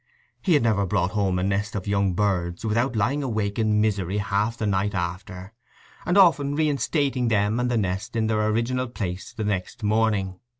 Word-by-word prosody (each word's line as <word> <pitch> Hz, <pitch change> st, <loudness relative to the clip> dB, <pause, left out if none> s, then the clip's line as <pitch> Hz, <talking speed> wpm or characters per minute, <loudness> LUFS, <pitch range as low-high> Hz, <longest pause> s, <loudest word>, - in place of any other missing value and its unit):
He 180 Hz, -5 st, +3 dB
had 145 Hz, -, +3 dB
never 105 Hz, -4 st, +2 dB
brought 90 Hz, +1 st, 0 dB
home 100 Hz, -3 st, 0 dB
a 90 Hz, -, -1 dB
nest 100 Hz, +2 st, -1 dB
of 95 Hz, -, -3 dB
young 100 Hz, -2 st, +1 dB
birds 90 Hz, -2 st, -1 dB
without 115 Hz, +4 st, 0 dB
lying 125 Hz, +8 st, +1 dB
awake 110 Hz, -5 st, -2 dB
in 105 Hz, -1 st, +2 dB
misery 100 Hz, -3 st, 0 dB
half 105 Hz, +3 st, -1 dB
the 110 Hz, -, -2 dB
night 100 Hz, 0 st, 0 dB
after, 90 Hz, +2 st, -5 dB, 0.5 s
and 180 Hz, +2 st, +2 dB
often 150 Hz, -7 st, +4 dB
reinstating 145 Hz, -3 st, 0 dB
them 105 Hz, +1 st, +1 dB
and 125 Hz, 0 st, 0 dB
the 120 Hz, -, +1 dB
nest 100 Hz, +2 st, -2 dB
in 110 Hz, -1 st, +1 dB
their 110 Hz, -1 st, +1 dB
original 120 Hz, +4 st, 0 dB
place 95 Hz, -6 st, -5 dB
the 115 Hz, -2 st, -5 dB
next 100 Hz, 0 st, -3 dB
morning. 105 Hz, -3 st, +1 dB
105 Hz, 185 wpm, -24 LUFS, 95-115 Hz, 0.5 s, often